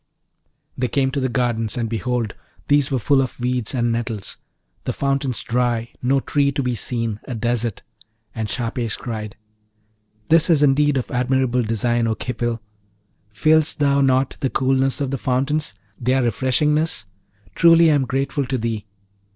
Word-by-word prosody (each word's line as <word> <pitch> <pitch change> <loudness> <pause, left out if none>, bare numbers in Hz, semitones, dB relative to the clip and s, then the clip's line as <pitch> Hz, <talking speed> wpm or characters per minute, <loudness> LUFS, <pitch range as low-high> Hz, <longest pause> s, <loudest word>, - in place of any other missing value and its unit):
They 125 - -1
came 135 +1 +1
to 140 - -2
the 130 -1 0
gardens, 120 -3 -1
and 115 -1 -1
behold, 115 0 -2 0.4
these 145 -1 +3
were 135 - 0
full 135 +3 +3
of 130 -1 -4
weeds 125 0 -1
and 120 -1 +1
nettles, 115 -3 -3 0.5
the - - -1
fountains 135 -2 -1
dry, 120 -1 0
no 135 +2 +2
tree 140 +1 +1
to 140 - -1
be 125 -1 0
seen 115 -1 -2
a 125 - -5
desert. 115 -1 -1 0.5
And 110 -2 -3
Shahpesh 115 -1 -2
cried, 110 -3 -6 0.9
'This 165 +1 +5
is 155 -3 +4
indeed 145 0 +3
of 125 - -3
admirable 125 0 +1
design, 115 +1 0
O 110 - 0
Khipil! 120 0 -3 0.7
Feelest 155 +8 +2
thou 140 -1 +3
not 130 0 +2
the 135 - 0
coolness 135 +2 +1
of 135 -2 -1
the 135 - -2
fountains? 135 -1 -1 0.2
their 130 +1 +1
refreshingness? 130 +3 +1 0.5
Truly 165 +2 +6
I - - +4
am 140 -2 +2
grateful 135 +1 -1
to 130 0 -1
thee! 110 -2 -3
125 Hz, 160 wpm, -21 LUFS, 115-140 Hz, 0.9 s, Truly